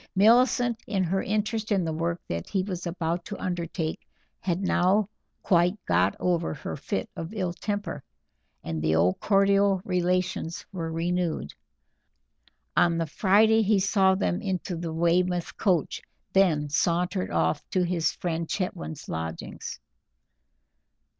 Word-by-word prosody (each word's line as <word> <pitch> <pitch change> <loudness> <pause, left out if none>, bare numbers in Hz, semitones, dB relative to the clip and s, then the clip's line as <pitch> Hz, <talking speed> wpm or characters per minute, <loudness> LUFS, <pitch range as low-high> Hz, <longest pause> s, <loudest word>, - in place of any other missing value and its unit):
Millicent, 235 +3 +4
in 195 -4 0
her 190 +2 0
interest 215 +2 -1
in 190 -4 +2
the 160 - -2
work 170 +2 -1
that 85 0 -4
he 190 -2 0
was 185 -2 -4
about 170 0 -2
to 205 - -6
undertake, 170 -2 -3 0.3
had 180 -2 -1
now 190 +1 +2 0.4
quite 175 +1 +3
got 90 +2 +2
over 170 -3 0
her - - -5
fit 195 +8 -3
of 165 +4 -6
ill 185 -4 -1
temper, 205 -7 -4 0.6
and 80 -1 -3
the 80 +1 +2
old 90 +3 +2
cordial 200 -1 +3
relations 180 -2 -1
were 165 -4 -4
renewed. 170 - -1 1.2
On 170 -1 +4
the 165 - 0
Friday 215 +6 +4
he 210 0 +3
saw 190 -1 +3
them 190 0 -1
into 190 -3 -2
the 165 -1 -4
Weymouth 175 +2 +1
coach, 180 -7 0 0.3
then 165 -6 +3
sauntered 170 - 0
off 80 0 +1
to 185 - +1
his 170 -2 +1
friend 165 -2 -3
Chetwynd's 170 -5 -4
lodgings. 80 0 -5
180 Hz, 135 wpm, -27 LUFS, 165-195 Hz, 1.2 s, Millicent